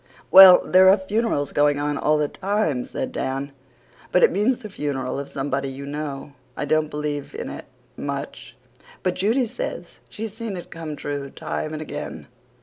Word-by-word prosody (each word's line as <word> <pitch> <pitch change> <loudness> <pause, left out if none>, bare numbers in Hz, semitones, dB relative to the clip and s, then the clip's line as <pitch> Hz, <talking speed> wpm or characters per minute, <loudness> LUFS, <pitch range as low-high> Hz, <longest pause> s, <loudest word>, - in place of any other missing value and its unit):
"Well, 190 -1 +10
there 185 +1 +6
are 195 - +6
funerals 195 -6 -1
going 145 0 +3
on 145 0 -1
all 150 +1 +2
the 150 -1 +1
time," 195 -8 -1
said - - -4
Dan. 135 +2 -3 0.6
"But 180 - +4
it - - +6
means 210 +7 +1
the 215 -4 -9
funeral 140 -4 -3
of 140 - -6
somebody 135 0 -2
you 135 +1 -7
know. 145 -1 -5 0.2
I - - -2
don't 155 +1 +1
believe 150 - -4
in 465 - -5
it - - -8 0.3
MUCH - - -6 0.5
but 185 - +1
Judy 230 +8 +1
says 235 +3 -6
she's 220 -1 -6
seen 220 -3 -5
it 175 - -10
come 160 -2 -6
true 145 -1 -5
time 155 - -4
and 155 0 -5
again. 145 0 -7
150 Hz, 175 wpm, -23 LUFS, 145-195 Hz, 0.6 s, Well